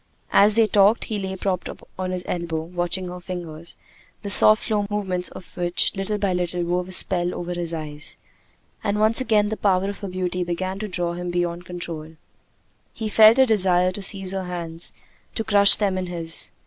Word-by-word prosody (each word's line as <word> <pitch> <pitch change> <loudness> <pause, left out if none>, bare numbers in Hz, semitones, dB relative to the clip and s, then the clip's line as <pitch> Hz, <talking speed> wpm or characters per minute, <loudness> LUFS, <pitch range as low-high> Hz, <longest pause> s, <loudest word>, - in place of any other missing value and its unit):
As 205 +1 +5
they 225 -1 +4
talked, 205 +2 +3
he 215 -2 -4
lay 190 -1 -4
propped 185 -1 -3 0.3
on 185 0 -2
his 180 -1 -4
elbow, 170 -2 -3
watching 175 +2 -3
her 180 0 -8
fingers, 170 -2 -5 0.5
the 200 - -1
soft 215 +1 +7
slow 205 -2 -1
movements 190 -4 -2
of 180 - -13
which 175 -1 +1
little 195 +2 -3
by 200 -2 -1
little 180 0 -2
wove 180 +1 -2
a - - -10
spell 180 -1 +3
over 175 0 -5
his 175 -1 -1
eyes. 150 -2 -5 0.7
And 205 0 -1
once 220 +3 +3
again 215 -4 +2
the 220 - -4
power 195 -1 +1
of 205 - -11
her 200 - -6
beauty 180 -1 -3
began 185 +2 -4
to 215 - -4
draw 175 -3 -3
him 175 0 -5
beyond 175 0 -3
control. 165 -3 -7 0.8
He 220 -1 -5
felt 220 +2 +6
a 265 - +6
desire 185 -5 +2
to 200 - -5
seize 195 -1 0
her 190 -1 -4
hands, 170 -2 -4 0.4
to 225 - -2
crush 200 -2 +6
them 195 -3 -1
in 185 - -4
his. 165 -2 -1
185 Hz, 195 wpm, -22 LUFS, 175-205 Hz, 0.8 s, soft